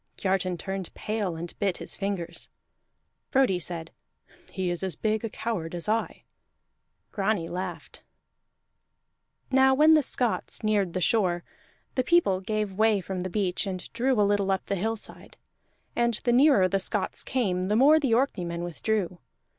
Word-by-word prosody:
Kiartan 185 Hz, -2 st, 0 dB
turned 190 Hz, +1 st, -5 dB
pale 210 Hz, -5 st, -2 dB
and 170 Hz, +1 st, -6 dB
bit 195 Hz, -3 st, 0 dB
his -, -, -5 dB
fingers. 180 Hz, -4 st, -3 dB, 0.8 s
Frodi 260 Hz, -9 st, +3 dB
said, 165 Hz, -1 st, -5 dB, 0.6 s
"He 185 Hz, -2 st, -2 dB
is 175 Hz, -, -3 dB
as 190 Hz, -5 st, -3 dB
big 215 Hz, +3 st, -1 dB
a 225 Hz, -, -2 dB
coward 200 Hz, -7 st, -4 dB
as 175 Hz, -, -4 dB
I." 225 Hz, +2 st, -1 dB, 0.9 s
Grani 195 Hz, -4 st, 0 dB
laughed. 175 Hz, -3 st, -6 dB, 1.5 s
Now 265 Hz, 0 st, +5 dB
when 310 Hz, +3 st, +6 dB
the 310 Hz, -, +6 dB
Scots 245 Hz, -5 st, -1 dB
neared 205 Hz, -5 st, +1 dB
the 185 Hz, -, -2 dB
shore, 180 Hz, -4 st, +2 dB, 0.5 s
the 255 Hz, -, +1 dB
people 260 Hz, -, +3 dB
gave 210 Hz, 0 st, -2 dB
way 215 Hz, +1 st, +3 dB
from 190 Hz, 0 st, -5 dB
the 185 Hz, -, -3 dB
beach 190 Hz, -1 st, -1 dB
and 185 Hz, -2 st, -6 dB
drew 255 Hz, -1 st, +1 dB
a 205 Hz, -, +5 dB
little 200 Hz, -1 st, +1 dB
up 190 Hz, -1 st, 0 dB
the 200 Hz, -, -1 dB
hillside; 220 Hz, +3 st, -5 dB, 0.6 s
and 235 Hz, -1 st, +2 dB
the 240 Hz, +3 st, +1 dB
nearer 255 Hz, -7 st, +5 dB
the 195 Hz, +2 st, 0 dB
Scots 190 Hz, -, -2 dB
came, 185 Hz, -8 st, 0 dB
the 210 Hz, -, +1 dB
more 290 Hz, +7 st, +6 dB
the 270 Hz, -6 st, +1 dB
Orkneymen 175 Hz, -10 st, -1 dB
withdrew. 180 Hz, +1 st, -2 dB
200 Hz, 155 wpm, -27 LUFS, 180-225 Hz, 1.5 s, when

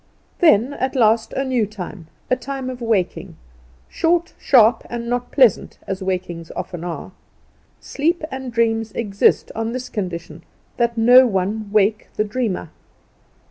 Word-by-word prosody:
Then 270 Hz, -, +4 dB
at 265 Hz, 0 st, -3 dB
last 225 Hz, -2 st, +3 dB
a 270 Hz, -, -1 dB
new 250 Hz, -5 st, 0 dB
time 190 Hz, -4 st, -8 dB, 0.2 s
the 255 Hz, -, +2 dB
time 265 Hz, 0 st, -5 dB
of 250 Hz, -1 st, -9 dB
waking; 220 Hz, -6 st, -1 dB, 0.5 s
short, 340 Hz, +1 st, 0 dB
sharp, 230 Hz, -3 st, +4 dB
and 235 Hz, 0 st, -5 dB
not 245 Hz, +1 st, -2 dB
pleasant, 255 Hz, -8 st, +3 dB
as 195 Hz, 0 st, -4 dB
wakings 180 Hz, -3 st, -4 dB
often 175 Hz, -2 st, -6 dB
are. 175 Hz, 0 st, -6 dB, 0.7 s
Sleep 325 Hz, +4 st, -1 dB
and 265 Hz, -1 st, -5 dB
dreams 225 Hz, -1 st, 0 dB
exist 205 Hz, -4 st, +1 dB
on 225 Hz, +1 st, -3 dB
this 255 Hz, 0 st, -5 dB
condition 180 Hz, -6 st, -5 dB, 0.4 s
that 235 Hz, -1 st, 0 dB
no 250 Hz, +3 st, +7 dB
one 205 Hz, +1 st, -2 dB
wake 210 Hz, +1 st, +2 dB
the 210 Hz, -, +1 dB
dreamer. 210 Hz, -6 st, -3 dB
225 Hz, 140 wpm, -20 LUFS, 200-255 Hz, 0.7 s, no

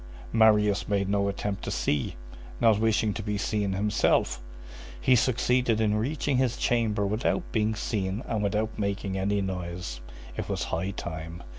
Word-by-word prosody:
Marius 105 Hz, -3 st, +4 dB
made 100 Hz, -2 st, +1 dB
no 100 Hz, 0 st, +1 dB
attempt 100 Hz, 0 st, -3 dB
to -, -, -3 dB
see, 65 Hz, +3 st, -1 dB, 0.4 s
not 110 Hz, -2 st, +4 dB
wishing 110 Hz, -1 st, +2 dB
to 110 Hz, -, -4 dB
be 105 Hz, -1 st, -2 dB
seen 105 Hz, -1 st, -1 dB
himself. 100 Hz, -10 st, +1 dB, 0.6 s
He 125 Hz, -, +4 dB
succeeded 125 Hz, -1 st, +2 dB
in 110 Hz, -2 st, +2 dB
reaching 135 Hz, +5 st, 0 dB
his 125 Hz, -2 st, +1 dB
chamber 110 Hz, -4 st, +1 dB
without 110 Hz, -, -1 dB
being 110 Hz, -2 st, +1 dB
seen 105 Hz, 0 st, -2 dB
and 110 Hz, -, -1 dB
without 105 Hz, +2 st, -1 dB
making 100 Hz, -1 st, -2 dB
any 100 Hz, +1 st, 0 dB
noise. 90 Hz, -9 st, -4 dB, 0.3 s
It -, -, -4 dB
was -, -, -1 dB
high 85 Hz, +4 st, 0 dB
time. 85 Hz, -2 st, -6 dB
105 Hz, 155 wpm, -27 LUFS, 95-110 Hz, 0.6 s, Marius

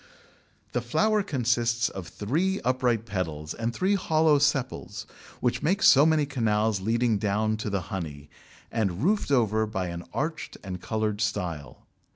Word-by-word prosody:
The 125 Hz, -, -1 dB
flower 210 Hz, -, +2 dB
consists 120 Hz, -, +1 dB
of 95 Hz, -3 st, -7 dB
three 165 Hz, -, -1 dB
upright 125 Hz, -3 st, +1 dB
petals 80 Hz, -7 st, -4 dB
and 115 Hz, 0 st, -2 dB
three 185 Hz, +11 st, +1 dB
hollow 160 Hz, -5 st, +3 dB
sepals, 140 Hz, -3 st, -1 dB, 0.4 s
which 125 Hz, -, 0 dB
make 190 Hz, +6 st, +1 dB
so 140 Hz, +3 st, +7 dB
many 155 Hz, -2 st, +3 dB
canals 110 Hz, -6 st, 0 dB
leading 115 Hz, +1 st, +1 dB
down 110 Hz, +2 st, 0 dB
to 110 Hz, 0 st, -4 dB
the 100 Hz, -2 st, -1 dB
honey, 80 Hz, -7 st, -6 dB, 0.4 s
and 100 Hz, -3 st, -1 dB
roofed 205 Hz, +1 st, +1 dB
over 110 Hz, -5 st, +2 dB
by 95 Hz, -4 st, -3 dB
an 85 Hz, 0 st, -6 dB
arched 155 Hz, +3 st, -3 dB
and 90 Hz, -2 st, -6 dB
coloured 110 Hz, -1 st, -2 dB
style. 85 Hz, -, -3 dB
115 Hz, 150 wpm, -27 LUFS, 100-140 Hz, 0.4 s, so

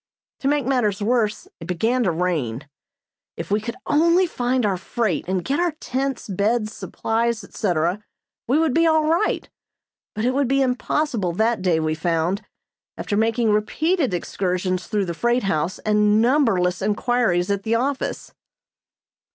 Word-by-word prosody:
To 270 Hz, -, -2 dB
make 290 Hz, -2 st, +1 dB
matters 245 Hz, -7 st, +1 dB
worse 215 Hz, 0 st, 0 dB
it 165 Hz, -, -9 dB
began 225 Hz, +8 st, 0 dB
to 180 Hz, -, +2 dB
rain. 155 Hz, -7 st, -2 dB, 0.7 s
If -, -, -6 dB
we 210 Hz, +1 st, +2 dB
could 235 Hz, +2 st, -5 dB
only 335 Hz, +5 st, +4 dB
find 250 Hz, -6 st, 0 dB
our 200 Hz, -2 st, +1 dB
freight 190 Hz, -1 st, -2 dB
and 185 Hz, -1 st, -1 dB
get 280 Hz, +3 st, 0 dB
our 350 Hz, -2 st, +1 dB
tents, 270 Hz, -4 st, -3 dB
beds, 215 Hz, +3 st, 0 dB
supplies, 230 Hz, 0 st, -2 dB
etc., 180 Hz, 0 st, -1 dB, 0.4 s
we 260 Hz, +5 st, +3 dB
would 320 Hz, -4 st, +2 dB
be 330 Hz, +3 st, +4 dB
all 315 Hz, -1 st, +3 dB
right, 335 Hz, +6 st, +1 dB, 0.7 s
but 215 Hz, +2 st, -1 dB
it 255 Hz, -, +2 dB
would 275 Hz, 0 st, +1 dB
be 275 Hz, +2 st, +2 dB
impossible 250 Hz, -, -1 dB
that 220 Hz, +4 st, +1 dB
day 175 Hz, -3 st, +2 dB
we 155 Hz, 0 st, 0 dB
found, 165 Hz, +3 st, -1 dB, 0.5 s
after 205 Hz, -, -2 dB
making 225 Hz, +1 st, +2 dB
repeated 290 Hz, -, +1 dB
excursions 185 Hz, 0 st, -2 dB
through 210 Hz, -3 st, 0 dB
the 170 Hz, -, -3 dB
freight 240 Hz, +7 st, +1 dB
house 175 Hz, -2 st, -1 dB
and 210 Hz, 0 st, +2 dB
numberless 225 Hz, -8 st, +2 dB
inquiries 205 Hz, -3 st, +1 dB
at 200 Hz, -1 st, 0 dB
the 225 Hz, +3 st, 0 dB
office. 270 Hz, +3 st, -2 dB
220 Hz, 155 wpm, -22 LUFS, 185-255 Hz, 0.7 s, only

